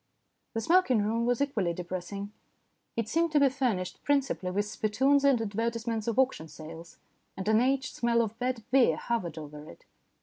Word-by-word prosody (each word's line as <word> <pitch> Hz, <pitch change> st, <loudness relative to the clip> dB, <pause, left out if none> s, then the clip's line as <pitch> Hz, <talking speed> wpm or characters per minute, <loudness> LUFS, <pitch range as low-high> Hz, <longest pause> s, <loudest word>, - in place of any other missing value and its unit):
The 225 Hz, -, 0 dB
smoking 265 Hz, -, +3 dB
room 230 Hz, +3 st, 0 dB
was 245 Hz, +1 st, +1 dB
equally 210 Hz, -12 st, -1 dB
depressing. 185 Hz, +3 st, -5 dB, 0.6 s
It 230 Hz, -2 st, -1 dB
seemed 330 Hz, +4 st, +1 dB
to 295 Hz, -, +5 dB
be 280 Hz, -1 st, +5 dB
furnished 240 Hz, -9 st, -2 dB
principally 275 Hz, -10 st, 0 dB
with 205 Hz, +2 st, 0 dB
spittoons 255 Hz, +7 st, +2 dB
and 275 Hz, -4 st, +4 dB
advertisements 225 Hz, +1 st, -2 dB
of 230 Hz, -, -1 dB
auction 260 Hz, -11 st, +1 dB
sales, 160 Hz, +2 st, -11 dB, 0.4 s
and 190 Hz, +1 st, -5 dB
an 220 Hz, +1 st, +4 dB
aged 265 Hz, +1 st, 0 dB
smell 235 Hz, -1 st, +2 dB
of 225 Hz, +1 st, -6 dB
bad 250 Hz, -2 st, -2 dB
beer 260 Hz, -2 st, +4 dB
hovered 180 Hz, -9 st, -2 dB
over 150 Hz, -1 st, -8 dB
it. -, -, -15 dB
230 Hz, 170 wpm, -29 LUFS, 195-260 Hz, 0.6 s, to